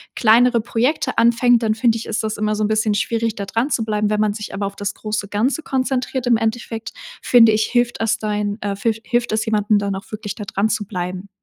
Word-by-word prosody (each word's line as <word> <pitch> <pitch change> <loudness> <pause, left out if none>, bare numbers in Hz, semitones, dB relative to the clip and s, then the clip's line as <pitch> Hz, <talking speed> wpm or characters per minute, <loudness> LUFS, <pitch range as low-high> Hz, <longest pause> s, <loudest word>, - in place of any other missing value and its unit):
kleinere 235 +1 +4
Projekte 255 +4 -1
anfängt, 235 0 +4
dann 215 -1 +1
finde 230 0 +2
ich, 225 - -7
ist 225 0 -2
das 215 0 -3
immer 215 0 0
so 215 - -1
'n - - +2
bisschen 215 0 +1
schwierig, 225 +2 -1
da 200 - -4
dran 230 +7 -1
zu 235 - 0
bleiben. 210 -1 0
Wenn 210 0 0
man 210 -1 +1
sich 210 0 -7
aber 200 0 -2
auf 200 0 -5
das 205 +1 -3
große 215 -1 -4
Ganze 225 +10 0
konzentriert 260 -2 -2
im 235 -2 +4
Endeffekt, 225 0 -3 0.3
finde 230 -3 +6
ich, 215 0 +2
hilft 240 -1 0
es 225 -1 +1
dein, 210 -1 -2
äh, 200 -1 -2
filf 220 +2 -1
hilft 240 0 -1
es 220 0 0
jemandem, 210 -1 +2
dann 200 -1 -2
auch 195 - -9
wirklich 215 -2 -5
da 210 - -6
dran 205 +1 0
zu 215 -1 -1
bleiben. 185 0 -5
220 Hz, 235 wpm, -20 LUFS, 210-235 Hz, 0.3 s, finde